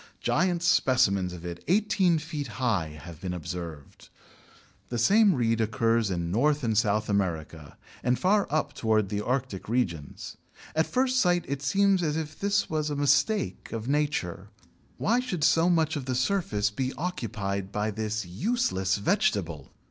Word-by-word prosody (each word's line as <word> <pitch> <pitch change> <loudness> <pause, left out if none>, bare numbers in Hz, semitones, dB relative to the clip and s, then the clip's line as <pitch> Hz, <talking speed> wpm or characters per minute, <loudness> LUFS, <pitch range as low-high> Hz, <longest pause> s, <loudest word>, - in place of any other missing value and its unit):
Giant 175 0 +1
specimens 110 - +3
of 90 -1 -9
it 85 0 -7
eighteen 190 -3 +3
feet 150 -2 -5
high 90 -12 -1
have 85 -3 -11
been 90 -1 -3
observed. 85 -3 -8 0.8
The 120 - -3
same 200 - +5
reed 115 -2 +1
occurs 115 0 +1
in 85 -2 -2
North 145 +7 +2
and 110 -2 0
South 105 0 +2
America 80 -6 -3 0.2
and 125 0 +1
far 200 +2 +2
up 145 -1 -1
towards 110 -6 +1
the 105 +1 -2
Arctic 125 -6 -3
regions. 85 - -3 0.4
At 160 +1 +2
first 255 0 +1
sight 175 -5 +2
it 140 0 -3
seems 195 +6 +2
as 155 -2 0
if 155 -1 -5
this 200 0 +1
was 155 -1 -1
a 145 - -2
mistake 185 +9 +1
of 115 0 -5
Nature; 145 - -1 0.5
why 235 +4 +2
should 190 -11 -3
so 165 +4 +4
much 160 -3 +2
of 140 -3 -4
the 130 -1 -2
surface 125 - 0
be 130 +4 -2
occupied 100 - -3
by 105 +1 -1
this 110 0 -3
useless 95 - 0
vegetable? 100 - 0
125 Hz, 155 wpm, -27 LUFS, 100-165 Hz, 0.8 s, same